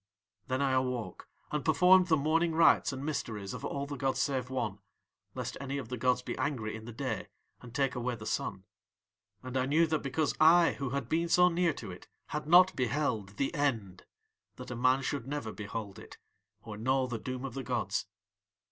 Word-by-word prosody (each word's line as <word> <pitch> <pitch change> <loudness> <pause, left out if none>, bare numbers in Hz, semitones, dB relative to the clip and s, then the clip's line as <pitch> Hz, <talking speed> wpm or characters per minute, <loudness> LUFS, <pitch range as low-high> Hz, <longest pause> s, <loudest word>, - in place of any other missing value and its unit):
Then 130 +2 0
I 135 - +2
awoke 125 -7 -2 0.2
and 150 -2 -1
performed 180 +3 +5
the 160 -3 +4
morning 160 +3 +1
rites 165 - +5
and 135 +1 -5
mysteries 110 -10 -3
of - - -7
All 140 0 -3
the 145 0 -6
gods 135 0 0
save 130 -3 -1
One, 110 -6 -3 0.6
lest - - -4
any 140 0 -3
of 130 -5 -6
the 125 - -3
gods 125 +1 +1
be - - -4
angry 130 -6 -2
in 110 0 -9
the 120 - -7
day 110 - -4 0.3
and 120 - -11
take 135 0 0
away 125 0 -2
the 110 - -10
Sun. 95 -3 -3 0.8
"And 130 0 -7
I 130 0 +1
knew 160 +4 +4
that 155 -1 0
because 140 +2 0
I 165 +2 +7
who 135 -2 -2
had 140 -2 -3
been 165 +4 0
so 180 +2 +6
near 175 0 +2
to - - -8
it - - -11 0.2
had 150 0 -4
not 180 +3 +6
beheld 120 -6 -1
THE 140 - -1
END 115 - -2 0.5
that 125 -1 -9
a - - -3
man 130 +3 +2
should 135 -2 -3
never 145 -6 -4
behold 105 -1 -6
it - - -12 0.5
or 105 -2 -8
know 130 +4 +1
the 120 -3 -4
doom 130 +3 -5
of 130 - -6
the 135 - -4
gods. 110 -7 -2
130 Hz, 200 wpm, -31 LUFS, 120-150 Hz, 0.8 s, I